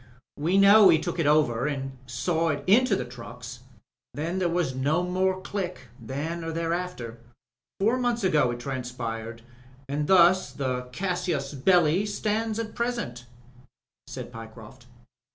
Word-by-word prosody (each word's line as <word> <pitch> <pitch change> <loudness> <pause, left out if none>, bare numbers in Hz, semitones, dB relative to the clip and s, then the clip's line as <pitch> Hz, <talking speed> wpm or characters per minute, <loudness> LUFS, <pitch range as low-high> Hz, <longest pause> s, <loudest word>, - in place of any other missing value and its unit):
We 170 +6 +1
know 200 0 +8
he 165 - +6
took 175 +2 -4
it 155 - +2
over 145 -4 +3
and 135 -2 -4
saw 160 +6 0
it 145 -2 -2
into 245 +7 +4
the - - -3
trucks. 120 0 -9 0.6
Then 165 +5 -2
there 180 -2 +1
was 170 -6 0
no 145 +7 +1
more 185 +1 0
Click 180 - -5
— 120 - -17
^then 150 +8 -4
or 165 - -3
thereafter. 165 -8 -3 0.6
Four 225 +6 +2
months 240 -2 0
ago 150 -8 +3
it 120 0 -4
transpired, 120 -3 -5 0.4
and 145 +2 -2
thus 185 0 +5
the 125 -2 -3
casus 175 -4 -2
belli 175 +5 +3
stands 215 +1 -1
at 230 -1 -4
present/' 235 - -3 0.8
said - - -7
Pyecroft. 115 +2 -11
160 Hz, 145 wpm, -26 LUFS, 125-185 Hz, 0.8 s, know